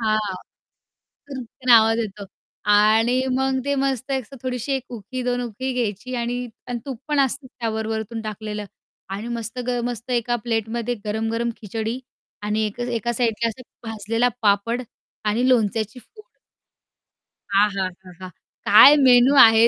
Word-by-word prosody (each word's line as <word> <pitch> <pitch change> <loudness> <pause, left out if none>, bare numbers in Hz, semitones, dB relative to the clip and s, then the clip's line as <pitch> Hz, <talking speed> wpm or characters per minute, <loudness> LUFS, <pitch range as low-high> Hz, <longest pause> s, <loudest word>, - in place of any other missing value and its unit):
हां, 215 -3 0 0.9
चुर्र्कन 255 -1 -5
आवाज 225 0 +6
येतो 210 -2 -4 0.5
आणि 225 +4 +4
मग 265 0 +1
ते 280 0 0
मस्त 270 -1 -1
एक 265 - 0
असं 275 - -13
थोडीशी 255 +1 -3
1 265 -2 -1
उकळी, 240 +3 -5
2 245 0 0
उकळी 245 +3 -4
घ्यायची 240 +1 -3
आणि 245 +1 -2 0.2
आणि 245 -1 -2
तूप 265 -5 -6
पण 295 -1 +2
असतं 270 0 0
त्यावर 225 -4 -4
वरून 225 +1 -3
टाकलेलं 215 -1 -5 0.5
आणि 220 +4 -6
मस्त 230 +1 -5
ग 245 -1 0
मस्त 240 0 -5
एका 240 0 +1
प्लेटमध्ये 230 +1 -1
गरम-गरम 225 +2 -1
खिचडी 220 +3 -4 0.4
आणि 210 +1 0
एक 210 +3 -7
अ, - - 0
एका 240 -1 -2
साईडला 230 -1 0
असा 230 +3 -8 0.3
भाजलेला 225 +3 0
पापड 215 +4 +2 0.4
आणि 230 +5 +1
लोणच्याची 220 -2 +1
फोड. 430 - -19 1.2
आहाहाहा! 190 -2 -1 0.4
काय 215 +8 +9
मेनू 260 -1 +6
आहे. 225 0 +8
230 Hz, 145 wpm, -22 LUFS, 215-250 Hz, 1.2 s, काय